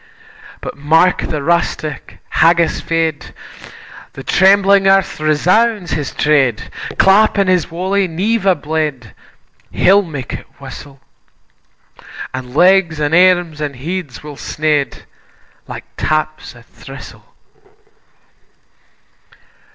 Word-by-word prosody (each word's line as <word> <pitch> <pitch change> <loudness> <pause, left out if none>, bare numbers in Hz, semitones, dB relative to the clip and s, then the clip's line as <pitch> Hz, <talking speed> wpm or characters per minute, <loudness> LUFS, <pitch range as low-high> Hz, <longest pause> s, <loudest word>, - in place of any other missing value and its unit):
But - - -6
mark 160 +5 +2
the 150 -3 -3
rustic, 155 -2 -2
haggis 170 0 +2
fed, 165 -2 -2 0.8
The - - -9
trembling 195 +1 +4
earth 195 -3 +2
resounds 180 +6 +1
his 145 -2 -2
tread, 135 -7 +1 0.3
Clap 205 +3 +4
in 200 - +3
his 185 -2 +1
walie 190 +3 -1
nieve 195 +5 -1
a 190 - +5
blade, 150 - -4 0.6
He'll 195 +3 +4
mak 150 -9 -7
it - - -7
whissle; 135 0 -11 1.3
An' 130 0 -7
legs, 180 -2 +3
an' 150 +1 -1
arms, 175 -3 +3
an' 145 -2 -3
heads 155 +1 -6
will 150 -2 -9
sned, 150 -2 -2 0.6
Like - - -8
taps 155 -2 -2
o' 120 - -16
thrissle. - - -13
160 Hz, 105 wpm, -16 LUFS, 150-185 Hz, 1.3 s, a